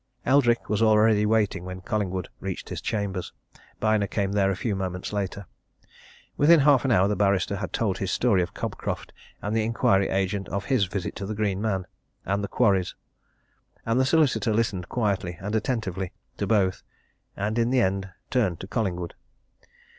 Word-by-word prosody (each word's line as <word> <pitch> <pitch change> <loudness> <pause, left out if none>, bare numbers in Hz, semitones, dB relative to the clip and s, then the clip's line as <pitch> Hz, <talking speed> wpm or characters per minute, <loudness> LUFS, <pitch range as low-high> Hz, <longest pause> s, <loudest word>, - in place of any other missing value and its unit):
Eldrick 125 -3 +3
was 105 +1 0
already 110 -1 +4
waiting 105 -4 +1
when 90 0 -6
Collingwood 95 -2 -2
reached 95 -1 -5
his - - -5
chambers: 100 -4 -3 0.5
Byner 110 -2 +2
came 100 -1 -1
there 100 -1 +2
a 95 - 0
few 105 +2 -2
moments 95 0 -4
later. 100 -1 -3 0.9
Within 155 +2 +6
half 140 -3 +5
an 135 - +1
hour 95 -3 +4
the 105 - 0
barrister 100 -1 +1
had 95 -1 -4
told 105 -5 -1
his 95 - -2
story 110 -7 +3
of 85 - -4
Cobcroft, - - -4 0.3
and 105 +2 -1
the 110 - +2
inquiry 100 -3 +2
agent 95 0 -1
his - - -10
of 100 - -2
his 130 -7 +2
visit 95 0 -4
to 100 - -5
the 110 - -3
Green 100 -2 -1
Man 95 -4 -1 0.4
and 100 +2 0
the - - -1
quarries. 100 -7 +1 0.9
And 115 +2 +1
the 130 - +4
solicitor 130 -8 +3
listened 105 -6 -1
quietly 100 -7 -1
and 100 +3 -4
attentively 110 -6 -2 0.2
to - - -2
both, 100 -4 +2 0.6
and 105 +3 -1
in 115 0 +2
the 130 -1 +3
end 95 -1 0 0.2
turned 100 -10 +1
to 95 - -7
Collingwood. 90 -6 -2
100 Hz, 175 wpm, -26 LUFS, 95-110 Hz, 0.9 s, Within